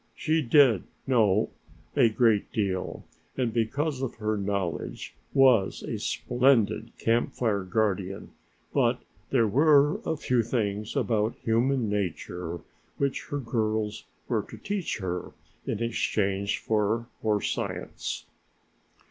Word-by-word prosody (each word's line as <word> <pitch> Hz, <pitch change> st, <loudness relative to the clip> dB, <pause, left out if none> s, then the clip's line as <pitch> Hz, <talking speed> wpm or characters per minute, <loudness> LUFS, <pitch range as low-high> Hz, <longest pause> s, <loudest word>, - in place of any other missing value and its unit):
She 160 Hz, +1 st, +1 dB
did 125 Hz, -, +5 dB, 0.2 s
know 110 Hz, -5 st, +3 dB, 0.4 s
a 115 Hz, -, +5 dB
great 110 Hz, -2 st, +2 dB
deal 95 Hz, -4 st, -2 dB, 0.3 s
and 120 Hz, -4 st, 0 dB
because 130 Hz, +5 st, 0 dB
of 135 Hz, -, -3 dB
her 110 Hz, -1 st, -1 dB
knowledge 100 Hz, -4 st, -3 dB, 0.2 s
was 125 Hz, -7 st, +4 dB
a -, -, -4 dB
splendid 120 Hz, -3 st, +2 dB
Camp 115 Hz, +1 st, +1 dB
Fire 105 Hz, -5 st, 0 dB
guardian, 95 Hz, -1 st, -1 dB, 0.4 s
but -, -, +2 dB, 0.3 s
there 120 Hz, -4 st, +3 dB
were 145 Hz, +5 st, +4 dB
a 160 Hz, -1 st, -1 dB
few 125 Hz, -4 st, +1 dB
things 105 Hz, -2 st, -2 dB
about 110 Hz, -1 st, +1 dB
human 120 Hz, +2 st, +2 dB
nature 90 Hz, -4 st, -3 dB, 0.4 s
which 140 Hz, -1 st, -1 dB
her 145 Hz, -, -3 dB
girls 110 Hz, -4 st, -1 dB, 0.2 s
were -, -, +1 dB
to -, -, -9 dB
teach 200 Hz, -4 st, -3 dB
her 90 Hz, -3 st, -4 dB, 0.3 s
in 115 Hz, -, -1 dB
exchange 100 Hz, -3 st, 0 dB
for 110 Hz, +2 st, 0 dB
her 105 Hz, -2 st, +2 dB
science. -, -, -4 dB
110 Hz, 120 wpm, -27 LUFS, 100-125 Hz, 0.4 s, did